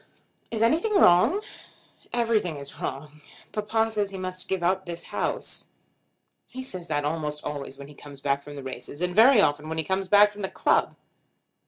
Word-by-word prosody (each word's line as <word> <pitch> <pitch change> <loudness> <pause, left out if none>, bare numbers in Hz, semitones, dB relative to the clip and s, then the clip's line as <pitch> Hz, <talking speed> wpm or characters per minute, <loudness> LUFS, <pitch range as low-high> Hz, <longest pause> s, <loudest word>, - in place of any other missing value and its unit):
"Is 225 -1 0
anything 335 - +2
wrong?" 340 - +5 0.7
"Everything 225 -8 +1
is 140 0 -10
wrong. 150 +3 -6 0.3
Papa 220 +1 0
says 205 -2 -1
he 195 - -7
must 185 0 -5
give 190 -2 -2
up 185 +1 +1
this 170 -1 -5
house." - - -2 0.8
"He 260 +1 -7
says 185 -9 -5
that 145 -3 -1
almost 150 -1 -3
always 140 -2 -5
when 140 0 -10
he 150 - -13
comes 145 -1 -12
back 140 0 0
from 145 +1 -10
the 140 - -7
races, 130 +2 -7
and 180 0 -1
very 235 +2 +7
often 150 -2 +1
when 160 - -3
he 160 - +1
comes 190 +3 -1
back 205 +2 +6
from 205 0 -10
the 190 - -2
club." - - +1
180 Hz, 185 wpm, -26 LUFS, 150-210 Hz, 0.8 s, very